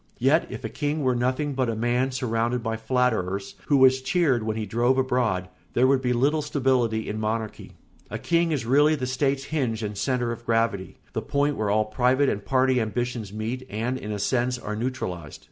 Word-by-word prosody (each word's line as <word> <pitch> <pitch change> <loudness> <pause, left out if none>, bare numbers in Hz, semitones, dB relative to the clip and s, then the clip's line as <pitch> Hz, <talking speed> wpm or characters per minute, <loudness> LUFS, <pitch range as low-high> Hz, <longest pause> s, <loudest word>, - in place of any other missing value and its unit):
Yet 140 +7 +3
if - - -7
a - - -1
king 150 0 -2
were 130 -1 +3
nothing 130 +4 0
but 130 -2 0
a 115 - -1
man 120 +4 +1
surrounded 120 -1 -1
by 115 -1 -1
flatterers, 110 -5 0
who 145 - +4
was 130 0 +5
cheered 150 -6 +2
when 110 0 -2
he 110 - -2
drove 120 +5 +1
abroad, 125 -8 +1 0.3
there 125 - +4
would 135 0 +3
be 125 -1 0
little 140 +6 +2
stability 130 -6 0
in 110 - -3
monarchy. 110 0 -3 0.4
A - - -4
king 170 -1 +1
is 140 -7 -1
really 145 +5 +4
the 130 -4 -3
state's 135 +1 0
hinge 125 -7 -2
and 105 0 -3
centre 120 +2 0
of 115 0 -6
gravity, 115 -4 0 0.2
the - - -1
point 145 +1 0
where 105 -1 -1
all 110 +1 +2
private 125 +5 +2
and 100 - -2
party 130 +1 +2
ambitions 115 -1 -3
meet 110 +5 -4
and, 115 +5 -2
in 105 - -6
a 105 - -2
sense, 125 +4 0
are 105 -3 -5
neutralised. 105 - -4
125 Hz, 200 wpm, -25 LUFS, 110-130 Hz, 0.4 s, was